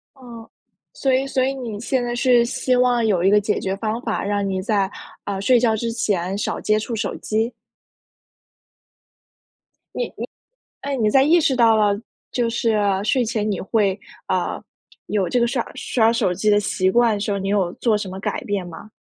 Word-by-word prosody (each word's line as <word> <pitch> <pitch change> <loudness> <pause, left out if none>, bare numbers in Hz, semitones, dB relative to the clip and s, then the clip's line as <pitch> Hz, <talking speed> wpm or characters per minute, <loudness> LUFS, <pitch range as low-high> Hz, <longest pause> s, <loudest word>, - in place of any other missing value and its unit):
哦， 235 -4 -12 0.4
所 270 -1 0
以 265 +1 +1
所 265 -1 0
以 270 +1 -1
你 235 -6 -6
现 250 0 -1
在 240 - -2
是 245 -1 +4
希 250 +1 0
望 245 -2 +3
有 195 -6 +2
一 195 - +4
个 210 - +5
解 210 +1 -1
决 190 0 -2
方 220 +2 -3
法， 220 -5 -2
让 200 -1 -1
你 190 -1 -2
在， 200 -2 0 0.3
呃， 195 -1 -3
睡 245 +5 +4
觉 225 -2 +2
之 230 +1 -2
前 195 -5 -1
少 - - -2
接 215 0 +2
触 225 +2 -4
手 220 - -2
机。 220 +3 -1 2.4
你 - - 0
你 - - -5 0.5
哎， 280 0 -3
你 220 -3 +2
在 270 - +5
意 335 +4 +5
识 275 -5 +2
到 230 -2 +5
了 205 -1 +3 0.4
就 240 -2 0
是 230 -1 0 0.3
睡 245 +4 +2
前 215 -2 -1
你 195 - -2
会， 200 -2 0 0.3
呃， - - -1 0.5
有 195 -4 0
这 250 - +1
个 235 - +3
刷 240 -1 -1
刷 225 -2 +2
手 190 -6 +1
机 205 +4 0
的 205 - +5
习 185 -2 0
惯 235 +2 +3
的 205 - -2
时 205 0 -2
候， 200 - 0
你 195 +1 -3
有 195 -4 +1
做 230 -3 +1
什 205 -2 -5
么 190 +1 -7
改 - - -3
变 200 -3 -2
吗？ 175 +5 -11
220 Hz, 215 characters per minute, -21 LUFS, 200-240 Hz, 2.4 s, 个